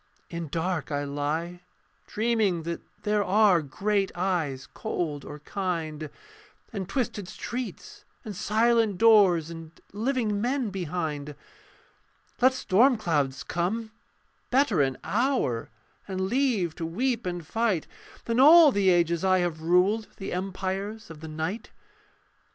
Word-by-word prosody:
In 170 -1 -4
dark 165 +1 -2
I 145 0 -1
lie: 150 +5 -3 0.5
dreaming 215 -6 0
that 170 +1 -4 0.2
there 210 0 +1
Are 195 -3 +4
great 195 +7 -1
eyes 165 -8 -1
cold 160 -9 -3
or 145 - -8
kind, 160 -4 -3 0.6
And 195 -3 -4
twisted 210 -4 -2
streets 245 +5 -6 0.2
and 210 -2 -6
silent 220 +1 +2
doors, 190 -7 +5
And 165 -1 -10
living 220 -2 -1
men 250 -2 -1
behind. 155 -5 -4 1.1
Let 260 +1 +6
storm 245 +3 +3
clouds 145 -9 -1
come: 215 +6 -2 0.6
better 250 - +3
an 135 -2 0
hour, 205 - 0 0.4
And 190 -1 -3
leave 215 - +1
to 165 - -3
weep 235 +5 -1
and 175 -2 -4
fight, 220 -3 0 0.4
Than 230 +1 0
all 310 +2 +9
the 200 -4 +2
ages 170 -1 +2
I 185 -1 +4
have 170 -3 -2
ruled 185 +6 +2
The 195 - -5
empires 190 +2 -4
of 160 - -10
the 160 - -8
night. 160 +8 -4
185 Hz, 130 wpm, -27 LUFS, 165-220 Hz, 1.1 s, all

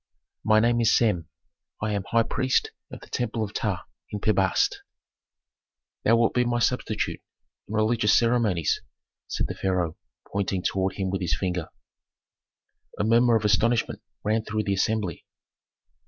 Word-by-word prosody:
"My 110 0 +5
name 120 +1 +3
is 115 - +4
Sem; 100 -9 +1 0.5
I 110 0 -1
am 100 -2 -2
high 115 +3 +2
priest 130 +3 0 0.2
of - - -9
the - - -14
temple 115 -2 -1
of 105 - -5
Ptah - - -2 0.3
in 105 - -4
Pi 105 - +2
Bast." 95 -3 +1 1.2
"Thou 115 - +5
wilt 115 -1 +2
be 125 - +3
my 120 0 0
substitute 120 -2 -1 0.5
in 105 - -7
religious 110 0 +3
ceremonies," 115 -8 +2 0.5
said - - -1
the - - -3
pharaoh, 90 -4 -1 0.3
pointing 95 -2 -2
toward 95 -1 0
him 95 -2 -2
with 95 0 -2
his 80 -4 0
finger. 90 -3 -2 1.3
A - - 0
murmur 115 +2 +4
of 110 -1 +1
astonishment 110 +3 +2 0.2
ran 110 +1 +1
through 110 0 -2
the 100 - 0
assembly. 100 -3 -1
110 Hz, 155 wpm, -26 LUFS, 95-115 Hz, 1.3 s, My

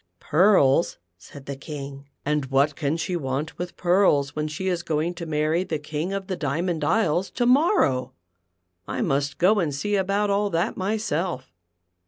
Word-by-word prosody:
"Pearls," 170 -4 +3 0.2
said 140 +9 -13
the 140 - -5
King; 140 -1 -8 0.2
"and 150 -2 0
what 140 +2 +2
can 150 +1 -1
she 175 +2 -2
want 140 0 -3
with 175 0 -5
pearls 175 -6 +2
when 150 0 -1
she 155 +5 -4
is 175 -2 0
going 165 +1 -1
to 170 -1 -7
marry 155 +3 +1
the 160 -4 -3
King 150 +4 -4
of 195 -1 -3
the 185 - -3
Diamond 160 +2 -2
Isles 185 0 +1
to 245 - -1
morrow 245 - +3 0.7
1 - - -5
I - - -1
must 140 0 -1
go 205 +4 +4
and 165 -5 0
see 205 +9 -1
about 200 +1 +1
all 205 +1 +1
that 175 +4 -1
myself." 190 - -2
165 Hz, 175 wpm, -24 LUFS, 145-190 Hz, 0.7 s, go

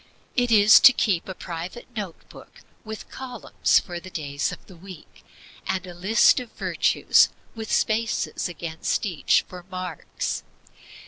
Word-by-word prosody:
It 245 -1 +2
is 215 0 +8
to 265 - +8
keep 195 -7 0
a 190 - -5
private 175 +8 -7
note 200 -6 -6
book - - -15 0.2
with 220 0 -9
columns 260 -1 0
for 175 -2 -7
the 185 - -11
days 145 -4 -3
of - - -10
the 185 - -15
week, 185 -1 -13 0.4
and 190 0 -2
a 180 - -9
list 190 +9 +4
of 245 -3 -9
virtues, - - +3 0.2
with 220 -1 -7
spaces 220 -3 0
against 165 +3 -3
each 175 -7 +1
for 180 -1 -10
marks. 185 -3 -4
185 Hz, 145 wpm, -24 LUFS, 175-220 Hz, 0.4 s, is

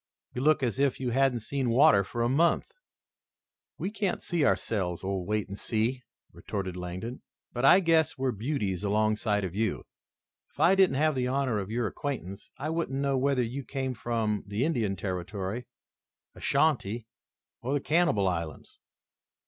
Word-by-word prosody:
"You 125 - -3
look 155 0 +3
as 125 +1 -1
if 140 -2 +2
you 125 -2 -1
hadn't 130 -1 +2
seen 130 +2 -2
water 115 -4 +6
for 115 +4 -3
a - - +2
month." 165 - +2 1.1
"We 195 - -3
can't 205 -3 -2
see 170 -3 0
ourselves, 95 -10 0
old 95 -2 -2
Wait 105 -1 0
and 100 0 -7
See," 120 +3 0 0.3
retorted 95 -3 -4
Langdon, 90 +7 -6 0.3
"but 120 +2 0
I 185 +7 +8
guess 165 -4 +3
we're 130 -1 0
beauties 105 - -2
alongside 105 0 +1
of 90 -2 -3
you. 110 0 -1 0.7
If - - -22
I 180 - +6
didn't 190 -7 +4
have 155 +3 +3
the 125 -2 -1
honor 130 -4 0
of 100 0 -5
your 120 +1 -1
acquaintance, 105 -6 -5
I 155 - -3
wouldn't 160 -5 -2
know 140 -1 +1
whether 135 -1 +2
you 130 +4 -4
came 130 -1 -3
from 110 -3 -1
the 105 +6 0
Indian 115 -11 0
Territory, 95 +4 -4 0.7
Ashantee 120 -8 +1 0.6
or 135 +4 -1
the - - +2
Cannibal 150 - +2
Islands." 85 -4 -4
120 Hz, 165 wpm, -28 LUFS, 100-140 Hz, 1.1 s, I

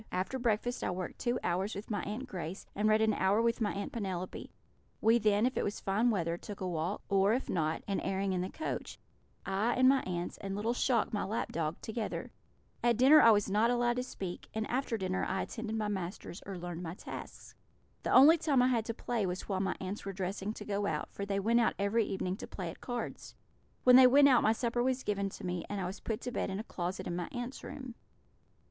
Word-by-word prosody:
After 190 +8 -2
breakfast 240 +1 0
I - - 0
worked 180 0 -4
two 240 0 0
hours 185 +4 -1
with 205 +3 -7
my 205 -3 0
Aunt 220 +6 -4
Grace, 185 -4 -6
and 210 +2 +1
read 215 0 +4
an 220 -1 +3
hour 195 +3 +2
with 230 +1 +1
my 210 - +1
Aunt 200 - -4
Penelope; 185 -5 -4 0.5
we 225 +2 +4
then, 210 0 +3
if 255 - 0
it - - 0
was 205 - -2
fine 210 +5 +1
weather, 170 -6 0
took 205 +2 -8
a 185 - -2
walk, 175 +3 -2
or, 200 +1 +3
if 260 - -3
not, 160 -2 0
an 200 - 0
airing 195 0 -1
in 180 - 0
the 185 - -3
coach 315 - -5 0.5
I, 200 +5 +1
and 255 0 +5
my 270 0 +5
aunts, 175 -1 -4
and 195 -1 -4
little 220 +4 0
Shock, 245 -2 +1
the 210 - -1
lap 220 +3 -2
dog, 160 -1 -2
together. 220 0 -4 0.5
At 240 -2 +3
dinner 280 +5 +8
I 230 - +8
was 205 -2 +4
not 210 +4 +3
allowed 240 0 +2
to - - +1
speak, 190 -8 -6
and 220 0 -1
after 250 -2 0
dinner 185 -1 -1
I 190 0 -1
attended 225 -1 -5
my 215 -1 -1
masters, 190 -2 -5
or 195 -2 -5
learned 175 -1 -5
my 170 -1 -5
tasks. - - -9 0.5
The - - -3
only 310 +6 +8
time 280 -6 +3
I 255 - +4
had 230 -3 +1
to 230 - -4
play 230 -5 -1
was 180 +1 -4
while 195 -2 -1
my 195 - 0
aunts 190 +3 -5
were 195 - -5
dressing 190 +2 -3
to - - -8
go 205 0 -1
out, - - -2
for 200 - -5
they 200 -1 0
went 230 +4 +3
out 230 - +2
every 205 +3 +1
evening 190 -1 -2
to - - -7
play 180 -4 -5
at - - -15
cards. 245 -1 -5 0.5
When 250 0 +8
they 260 -1 +9
went 280 +2 +7
out 250 -3 +5
my 215 - +4
supper 235 +1 -1
was 255 +1 0
given 200 -1 -1
to 195 - -9
me, 180 -1 -2
and 205 - -3
I 185 - -2
was 185 +3 -5
put 220 -2 -3
to 250 - -4
bed - - -2
in 190 +1 -3
a - - -4
closet 180 -4 -4
in 175 - -3
my 175 -1 -3
aunts' 245 +1 -5
room. 260 -3 -7
205 Hz, 240 wpm, -32 LUFS, 190-240 Hz, 0.5 s, they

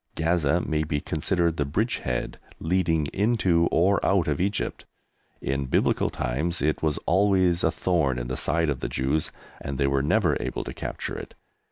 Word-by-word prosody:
Gaza 80 0 +1
may 80 -2 -1
be 75 -1 -1
considered 85 +3 0
the 75 - +1
bridgehead 70 - -2 0.2
leading 80 -3 +1
into 95 -6 +2
or 95 +4 +2
out 95 -4 +2
of 75 +1 0
Egypt. 100 +2 -2 0.6
In 70 0 -2
Biblical - - +2
times 75 +9 -2
it 75 +1 0
was 75 -2 0
always 95 -2 +3
a - - +4
thorn 80 -7 0
in - - -3
the 65 +1 -3
side 80 -2 +1
of 70 - -3
the - - -3
Jews, 70 +4 0 0.3
and 70 -1 -4
they 70 - +1
were 70 0 +2
never 75 +1 +2
able - - -3
to - - -6
capture - - -5
it. - - -8
80 Hz, 175 wpm, -26 LUFS, 70-90 Hz, 0.6 s, a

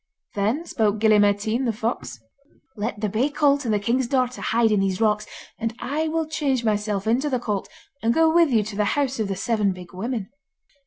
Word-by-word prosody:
Then 220 +11 0
spoke 215 -8 0
Gille 215 -1 +4
Mairtean 205 +5 +2
the 235 - +2
fox: 220 - -4 0.6
'Let 215 0 -4
the 215 - +1
bay 225 +8 0
colt 285 -2 +2
and 225 - 0
the 210 - +3
king's 240 +4 0
daughter 255 -1 0
hide 230 0 +2
in 210 - +3
these 195 -1 0
rocks, 210 -1 +1 0.3
and 225 0 -2
I 290 +6 -2
will 320 0 -1
change 280 -6 -1
myself 210 -2 0
into 250 +7 +1
the 260 - +1
colt, 210 -5 -3 0.3
and 225 - +2
go 320 +4 +3
with 335 -2 +5
you 225 -4 +3
to 210 0 -7
the 210 0 +1
house 270 -3 0
of 215 - 0
the 195 - -2
Seven 210 0 0
Big 180 -1 -12
Women. 215 +1 -4
225 Hz, 210 wpm, -23 LUFS, 210-260 Hz, 0.6 s, with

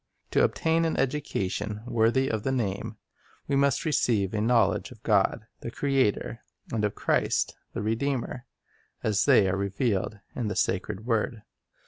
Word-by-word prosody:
To - - +4
obtain 165 +1 +2
an 165 - 0
education 105 -6 -2
worthy 120 +2 +2
of 110 -4 -1
the 135 - -1
name, 105 -6 -2 0.5
we 140 - +1
must 140 +1 +2
receive 115 - +1
a 105 - 0
knowledge 115 -3 +2
of 120 -3 -15
God, 105 +1 +2
the - - -5
Creator, 130 -3 0 0.3
and 110 -2 0
of 105 - 0
Christ, - - +1 0.2
the - - -3
Redeemer, 125 +2 -2 0.6
as 105 -1 +2
they 100 - +6
are 95 - +1
revealed 100 +1 -1 0.2
in 120 -4 -2
the 105 - -2
sacred 100 +2 -1
word. 115 -1 -1
115 Hz, 150 wpm, -27 LUFS, 105-130 Hz, 0.6 s, they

